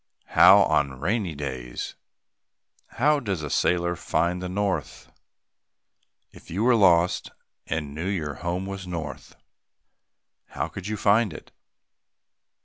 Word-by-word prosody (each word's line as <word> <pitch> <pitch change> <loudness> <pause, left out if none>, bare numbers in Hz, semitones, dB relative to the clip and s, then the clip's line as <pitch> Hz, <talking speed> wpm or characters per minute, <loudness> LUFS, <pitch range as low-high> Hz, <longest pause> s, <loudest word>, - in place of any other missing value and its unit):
How - - +7
on 65 -3 0
rainy 95 - -1
days? 65 -4 -5 1.0
How 150 +4 +3
does 100 - -3
a 75 - -5
sailor 85 0 +1
find 90 +2 -1
the 90 - -4
north? 95 -5 -3 1.2
If - - -16
you 95 +6 -2
were 125 +1 +5
lost 90 -5 +3 0.4
and 75 -3 -3
knew 80 +5 -4
your 80 -7 -2
home 90 +2 -2
was 95 -1 -6
north, 85 -4 -6 1.1
how - - -4
would 95 0 -7
you 110 0 -3
find 105 +1 +3
it? - - -11
90 Hz, 125 wpm, -25 LUFS, 80-100 Hz, 1.2 s, How